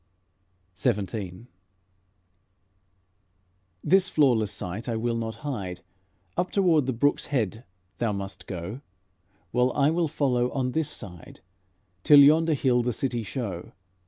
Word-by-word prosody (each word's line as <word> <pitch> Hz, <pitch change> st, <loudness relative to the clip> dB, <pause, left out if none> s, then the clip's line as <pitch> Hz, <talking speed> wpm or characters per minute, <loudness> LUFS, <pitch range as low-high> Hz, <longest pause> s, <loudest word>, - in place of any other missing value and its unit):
XVII 100 Hz, +1 st, -2 dB, 2.4 s
"This 190 Hz, 0 st, +4 dB
flawless 120 Hz, -9 st, +3 dB
sight 100 Hz, +7 st, -5 dB
I 115 Hz, -, -1 dB
will 115 Hz, +1 st, -1 dB
not 110 Hz, -1 st, -3 dB
hide; 95 Hz, -11 st, -4 dB, 0.5 s
Up 180 Hz, -, 0 dB
toward 170 Hz, -8 st, +3 dB
the -, -, +1 dB
brook's 145 Hz, +5 st, +1 dB
head 115 Hz, -5 st, -1 dB, 0.4 s
thou 115 Hz, -2 st, +1 dB
must 100 Hz, -1 st, -6 dB
go, 95 Hz, +7 st, -6 dB, 0.7 s
While 125 Hz, +1 st, +2 dB
I 145 Hz, +1 st, +3 dB
will 170 Hz, 0 st, +1 dB
follow 125 Hz, -5 st, 0 dB
on 130 Hz, -2 st, -1 dB
this 160 Hz, +2 st, -1 dB
side, 90 Hz, -5 st, -10 dB, 0.6 s
Till 145 Hz, -1 st, +8 dB
yonder 155 Hz, +2 st, +5 dB
hill 125 Hz, -3 st, +2 dB
the 120 Hz, 0 st, -1 dB
city 120 Hz, 0 st, -2 dB
show." 105 Hz, -5 st, -5 dB
120 Hz, 125 wpm, -26 LUFS, 105-145 Hz, 2.4 s, Till